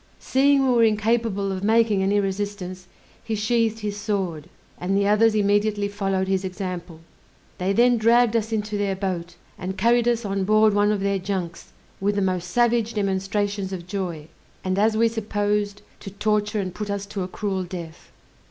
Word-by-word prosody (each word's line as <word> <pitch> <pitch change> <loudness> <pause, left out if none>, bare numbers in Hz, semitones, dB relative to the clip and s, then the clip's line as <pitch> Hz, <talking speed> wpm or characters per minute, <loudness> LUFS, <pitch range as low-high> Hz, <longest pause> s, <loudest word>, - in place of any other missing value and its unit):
Seeing 275 +1 +3
we 255 - +3
were 235 -1 +4
incapable 215 -2 +1
of 190 0 -4
making 220 -2 +3
any 200 +2 +2
resistance, 195 -2 -4 0.4
he 225 -1 -2
sheathed 225 +1 0
his 205 -1 -3
sword, 190 -7 -3 0.3
and 190 +2 0
the 200 0 +2
others 215 +1 +4
immediately 205 0 +2
followed 195 -2 -1
his 190 0 0
example. 180 -3 -5 0.6
They 185 +2 0
then 240 +3 +4
dragged 235 +1 +4
us 220 0 0
into 210 -1 -2
their 200 -1 0
boat, 185 -3 -4 0.2
and 190 +1 -4
carried 235 +3 +3
us 235 -1 +1
on 195 -1 -1
board 215 +1 +4
one 205 +1 +3
of 205 -2 -1
their 200 0 0
junks, 180 -3 -4 0.3
with 200 +1 0
the 200 - +1
most 180 -2 -1
savage 235 +1 +1
demonstrations 200 0 -1
of 180 -3 -6
joy, 180 -6 -4 0.4
and 185 +1 0
as 215 +1 +3
we 230 +1 +4
supposed, 205 -2 -1 0.2
to - - -8
torture 210 +1 0
and 185 -3 -3
put 210 +1 -5
us 200 0 -2
to 200 -1 -5
a 180 - -2
cruel 190 0 -3
death. 170 -2 -9
205 Hz, 180 wpm, -23 LUFS, 190-215 Hz, 0.6 s, were